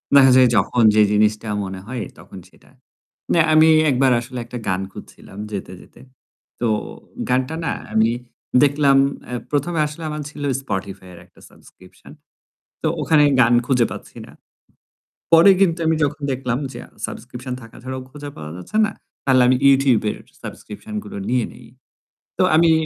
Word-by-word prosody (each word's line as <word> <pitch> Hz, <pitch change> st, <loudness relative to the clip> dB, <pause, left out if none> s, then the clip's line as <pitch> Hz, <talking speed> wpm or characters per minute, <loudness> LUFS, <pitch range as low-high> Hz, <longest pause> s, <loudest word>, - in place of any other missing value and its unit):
দেখা 135 Hz, -2 st, +7 dB
যায় 130 Hz, -2 st, +6 dB
যখন 115 Hz, +4 st, +2 dB
যে 110 Hz, -, +6 dB
জিনিসটা 105 Hz, +1 st, +1 dB, 0.2 s
মনে 95 Hz, 0 st, -6 dB
হয় 125 Hz, -2 st, -4 dB, 0.2 s
তখন -, -, -13 dB
সেটা। -, -, -24 dB, 0.6 s
না 170 Hz, -, +3 dB
আমি 155 Hz, +1 st, +6 dB, 0.2 s
একবার 130 Hz, 0 st, +3 dB
আসলে 125 Hz, +1 st, -8 dB
একটা 120 Hz, +1 st, -7 dB
গান 95 Hz, 0 st, 0 dB
খুঁজছিলাম 95 Hz, -, -13 dB
যেতে, 95 Hz, -2 st, -6 dB
যেতে। -, -, -18 dB, 0.6 s
তো 120 Hz, -, 0 dB, 0.6 s
গানটা 130 Hz, +5 st, 0 dB
না -, -, 0 dB, 0.2 s
আমি 110 Hz, +1 st, +3 dB, 0.5 s
দেখলাম 140 Hz, -1 st, +3 dB, 0.3 s
এ্যা 125 Hz, -, -4 dB
১ম 145 Hz, +4 st, -1 dB
এ -, -, +4 dB
আসলে 150 Hz, +2 st, -9 dB
আমার 150 Hz, 0 st, -4 dB
ছিল 150 Hz, -1 st, -9 dB, 0.2 s
Spotify 95 Hz, -5 st, -6 dB
এর 85 Hz, -, -13 dB
একটা -, -, -24 dB
সাবস্ক্রিপশন। 90 Hz, 0 st, -18 dB, 0.7 s
তো -, -, 0 dB
ওখানে 155 Hz, -2 st, +4 dB, 0.2 s
গান 120 Hz, 0 st, +4 dB
খুঁজে 125 Hz, -3 st, +2 dB
পাচ্ছি -, -, -12 dB
না। -, -, -14 dB, 1.0 s
পরে 165 Hz, +4 st, +8 dB
কিন্তু 180 Hz, -3 st, +3 dB
আমি 160 Hz, 0 st, +2 dB
যখন 145 Hz, +1 st, -3 dB
দেখলাম 125 Hz, -2 st, -2 dB
যে -, -, -8 dB
আ -, -, -23 dB, 0.2 s
সাবস্ক্রিপশন 125 Hz, +1 st, -7 dB
থাকা 115 Hz, -, -14 dB
ছাড়াও 130 Hz, +1 st, -6 dB
খোঁজা 145 Hz, +1 st, -9 dB
পাওয়া 75 Hz, -1 st, -8 dB
যাচ্ছে 90 Hz, -, -7 dB
না, 220 Hz, -, -5 dB, 0.3 s
তাহলে 130 Hz, -2 st, +4 dB
আমি 130 Hz, -, +4 dB
YouTube 135 Hz, -5 st, +3 dB
এর -, -, -6 dB, 0.2 s
সাবস্ক্রিপশন 215 Hz, -, -9 dB
গুলো -, -, -8 dB
নিয়ে 125 Hz, -2 st, +1 dB
নেই। -, -, -15 dB, 0.7 s
তো -, -, +3 dB
আমি 165 Hz, +1 st, +5 dB
130 Hz, 165 wpm, -20 LUFS, 110-145 Hz, 1.0 s, পরে